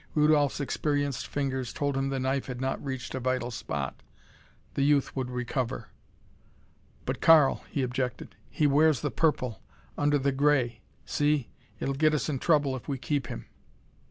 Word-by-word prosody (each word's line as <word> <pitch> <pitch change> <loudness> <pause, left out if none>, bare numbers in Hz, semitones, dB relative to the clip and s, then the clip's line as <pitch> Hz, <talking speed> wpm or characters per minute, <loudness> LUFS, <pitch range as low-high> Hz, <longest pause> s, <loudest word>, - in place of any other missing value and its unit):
Rudolph's 150 -2 +3
experienced 145 -2 -1
fingers 130 -3 -2
told 145 -1 -1
him 135 0 0
the 135 -1 -1
knife 130 +1 -1
had 125 -2 -5
not 130 +1 -2
reached 130 -3 -4
a 130 - -2
vital 130 -1 -1
spot. - - -4 0.7
The - - -1
youth 140 0 +2
would 130 -2 -2
recover. 125 0 -3 1.2
"But - - -3
Karl," 155 -4 +6
he 140 - -1
objected, 125 0 -3
"he 150 - 0
wears 145 -2 +4
the - - -1
purple. 130 -7 0 0.4
Under 145 0 +3
the 140 0 +1
gray. 135 -5 +2 0.2
See! 145 -3 +1 0.3
It'll 135 - -1
get 155 +2 +3
us 145 0 -1
in 135 -3 -1
trouble 145 -4 +2
if 125 - -8
we 140 - -2
keep 140 -1 -1
him." - - -6
135 Hz, 160 wpm, -28 LUFS, 130-145 Hz, 1.2 s, Karl